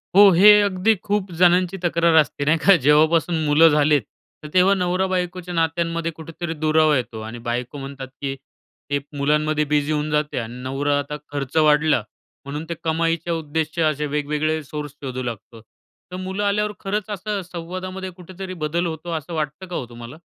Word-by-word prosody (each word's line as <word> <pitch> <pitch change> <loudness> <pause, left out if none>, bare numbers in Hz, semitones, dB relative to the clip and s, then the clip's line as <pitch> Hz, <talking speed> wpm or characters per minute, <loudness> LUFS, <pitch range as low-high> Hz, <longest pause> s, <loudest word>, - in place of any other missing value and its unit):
हो. 205 0 +9
हे 190 +5 +8
अगदी 200 +2 +2
खूप 205 -2 -1
जणांची 180 +1 +3
तक्रार 170 -1 +2
असते. 145 -1 -4
नाही 155 +3 +3
का? 195 - +8
जेव्हापासून 160 +3 +3
मुलं 150 +2 +6
झालेत, 150 -1 +3 0.4
तर - - -6
तेव्हा 185 +2 +5
नवरा-बायकोच्या 180 -1 -1
नात्यांमध्ये 165 0 -1
कुठेतरी 165 +1 -6
दुरावा 155 0 +3
येतो 115 -3 -4
आणि 120 +2 -8
बायको 120 +3 -3
म्हणतात 135 -1 -7
की 135 -1 -2 0.5
ते 145 0 +1 0.2
मुलांमध्ये 150 +1 +1
बिझी 145 0 0
होऊन 150 0 -1
जाते 150 -2 0
आणि 120 +2 -7
नवरा 140 +2 0
आता 145 +1 -5
खर्च 140 +1 -4
वाढला, 150 -4 +4 0.4
म्हणून 150 +3 -5
ते - - -1
कमाईच्या 165 +1 0
उद्देश्य 160 +1 -2
असे 150 -1 0
वेगवेगळे 150 +2 -1
सोर्स 150 0 -6
शोधू 130 -1 -4
लागतो. 115 -1 -7
तर 180 +10 -17
मुलं 190 +2 -3
आल्यावर 210 +1 +1
खरंच 205 +1 -3
असं 205 0 -3
संवादामध्ये 185 +2 -6
कुठेतरी 185 +1 -9
बदल 170 +3 -1
होतो, 165 +1 -5
असं 160 +1 -4
वाटतं 155 +3 -3
का 180 - -6
हो - - -3
तुम्हाला? 120 +4 -10
160 Hz, 165 wpm, -22 LUFS, 145-180 Hz, 0.5 s, हो